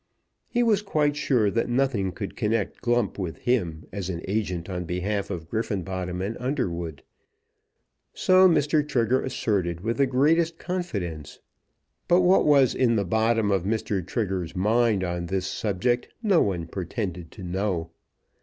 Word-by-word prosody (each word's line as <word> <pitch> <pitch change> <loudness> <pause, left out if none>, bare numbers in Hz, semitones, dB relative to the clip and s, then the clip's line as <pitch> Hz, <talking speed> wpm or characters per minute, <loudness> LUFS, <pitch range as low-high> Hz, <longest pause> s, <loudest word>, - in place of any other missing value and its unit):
He 240 0 +1
was 215 -4 +3
quite 150 -7 +1
sure 120 -8 +2
that 115 +3 0
nothing 120 -7 +1
could 100 +1 -6
connect 110 -2 -1
Glump 120 -4 0
with 90 -4 -4
him 85 -11 -1
as 95 -3 -4
an 85 -2 -4
agent 95 -4 -2
on 90 -2 -4
behalf 95 +4 -2
of 85 -5 -5
Griffenbottom 95 -3 -3
and 105 +4 -3
Underwood. 85 - -3 1.1
So 185 0 +5
Mr. 150 -2 +3
Trigger 130 -3 +1
asserted 95 -9 -1
with 115 +3 -2
the 140 -1 +3
greatest 160 +6 +2
confidence; 100 - -4 0.7
but 175 +1 +5
what 180 -1 +4
was 140 -4 +5
in 120 -3 +2
the 100 -2 +1
bottom 110 +2 +2
of 95 -2 +2
Mr. 105 -2 -1
Trigger's 95 -2 -3
mind 110 +1 +2
on 85 -1 -3
this 95 +1 -1
subject 115 +6 -1 0.2
no 200 -6 +4
one 90 -5 0
pretended 90 -1 -4
to 100 - -10
know. 90 -2 -2
105 Hz, 150 wpm, -25 LUFS, 90-130 Hz, 1.1 s, So